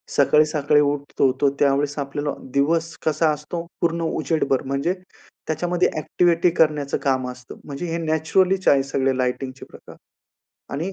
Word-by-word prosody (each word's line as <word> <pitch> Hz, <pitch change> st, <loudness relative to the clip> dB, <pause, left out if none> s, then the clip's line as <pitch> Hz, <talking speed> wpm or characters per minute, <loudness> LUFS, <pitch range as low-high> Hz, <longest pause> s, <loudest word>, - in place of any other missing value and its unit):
सकाळी-सकाळी 150 Hz, 0 st, +3 dB
उठतो, 145 Hz, -2 st, +1 dB
तो 140 Hz, -, +5 dB
त्यावेळेस 145 Hz, +1 st, +1 dB
आपल्याला 145 Hz, +1 st, -3 dB, 0.2 s
दिवस 165 Hz, +4 st, +1 dB
कसा 155 Hz, +1 st, +2 dB
असतो 150 Hz, +3 st, -6 dB, 0.2 s
पूर्ण 170 Hz, 0 st, 0 dB
उजेडभर, 155 Hz, -4 st, 0 dB
म्हणजे 140 Hz, +6 st, 0 dB, 0.5 s
त्याच्यामध्ये 175 Hz, +3 st, +1 dB
ॲक्टिव्हिटी 170 Hz, +2 st, +2 dB
करण्याचं 150 Hz, -3 st, +2 dB
काम 130 Hz, -2 st, 0 dB
असतं. 125 Hz, 0 st, -12 dB
म्हणजे 140 Hz, +5 st, -6 dB
हे 165 Hz, -, -1 dB
नॅचरलीच 180 Hz, +5 st, +1 dB
आहे 135 Hz, -1 st, +5 dB
सगळे 135 Hz, -1 st, 0 dB
लायटिंगचे 130 Hz, +1 st, -3 dB
प्रकार -, -, -14 dB, 0.8 s
आणि 165 Hz, +7 st, -3 dB
150 Hz, 130 wpm, -22 LUFS, 140-165 Hz, 0.8 s, तो